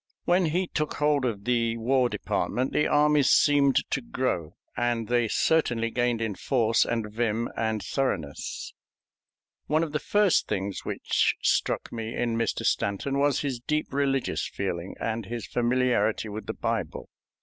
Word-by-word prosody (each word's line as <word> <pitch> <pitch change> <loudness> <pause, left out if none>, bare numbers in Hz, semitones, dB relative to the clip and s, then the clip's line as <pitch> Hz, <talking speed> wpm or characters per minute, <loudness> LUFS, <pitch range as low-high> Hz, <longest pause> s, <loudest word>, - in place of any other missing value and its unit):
When 180 +1 +3
he 180 +4 0
took 155 -3 -3
hold 150 -2 +2
of 105 -5 -2
the 115 -1 +1
War 125 +2 +2
Department 130 +2 -2
the 150 - +2
armies 150 -1 +4
seemed 140 -2 +4 0.2
to 135 - 0
grow, 100 -10 -2 0.2
and 120 -2 0
they 120 -1 +2
certainly 120 -4 +1
gained 120 -1 0
in 110 -2 -2
force 115 +1 +2
and 115 -2 -2
vim 115 0 -1
and 110 -2 -1
thoroughness. 95 - -3 0.9
One 155 +2 +2
of 160 - -3
the 150 - -1
first 205 +1 +2
things 95 0 -3
which - - 0
struck - - +1
me 115 -1 -4
in 120 -1 0
Mr. 115 0 -1
Stanton 135 +8 0
was 145 -1 +2
his 135 -4 -2
deep 150 +4 -2
religious 135 -1 0
feeling 90 -2 -4
and 115 -2 -3
his 120 -1 -5
familiarity 120 -3 +1
with 105 0 -7
the 110 - -3
Bible. 115 -8 -3
120 Hz, 155 wpm, -27 LUFS, 110-140 Hz, 0.9 s, armies